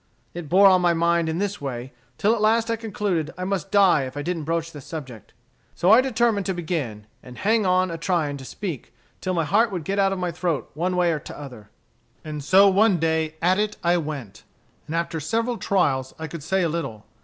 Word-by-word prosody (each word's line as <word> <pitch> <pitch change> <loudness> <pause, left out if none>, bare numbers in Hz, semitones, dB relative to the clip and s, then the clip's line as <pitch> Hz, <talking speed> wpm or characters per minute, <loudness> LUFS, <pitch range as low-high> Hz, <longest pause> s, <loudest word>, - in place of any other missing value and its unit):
It 170 -4 -7
bore 195 +3 +6
on 185 -2 +6
my 175 -1 +3
mind 170 0 +2
in 160 - -2
this 205 -1 -2
way, 130 -2 -5 0.2
till 210 +3 +3
at 230 - -2
last 225 +2 +2
I - - +1
concluded 205 -7 -2
I 185 - -4
must 190 -3 -2
die 190 -9 +4
if 130 +2 -8
I 145 - -3
didn't 165 -2 -3
broach 165 +1 -2
the 145 - -10
subject. 130 -7 -9 0.4
So 180 - +3
I 230 +3 +8
determined 230 -6 +1
to 190 - -1
begin 150 - -4 0.2
and 125 -1 -12
hang 215 0 +2
on 185 0 +2
a 165 - -5
trying 160 -5 0
to 135 - -10
speak, 155 - -6 0.3
till 185 -1 -2
my 165 -2 +1
heart 215 +8 +3
would 180 -4 -4
get 195 +6 -2
out 195 -1 +3
of 195 - -2
my 180 -1 -2
throat 170 -3 -2
one 180 +5 -1
way 175 -1 +2
or 155 - -1
t'other. 125 -8 -10 0.6
"And 150 -2 -5
so 190 +7 +6
one 200 0 +4
day 160 -1 0
at 185 +3 +3
it 210 0 -1
I 175 +1 +3
went, 140 - -6 0.5
and 160 - -4
after 170 -1 -2
several 230 - -1
trials 135 -9 0
I 160 - -5
could 160 0 -7
say 190 +5 0
a - - +2
little. 135 -10 -4
170 Hz, 225 wpm, -23 LUFS, 150-195 Hz, 0.6 s, I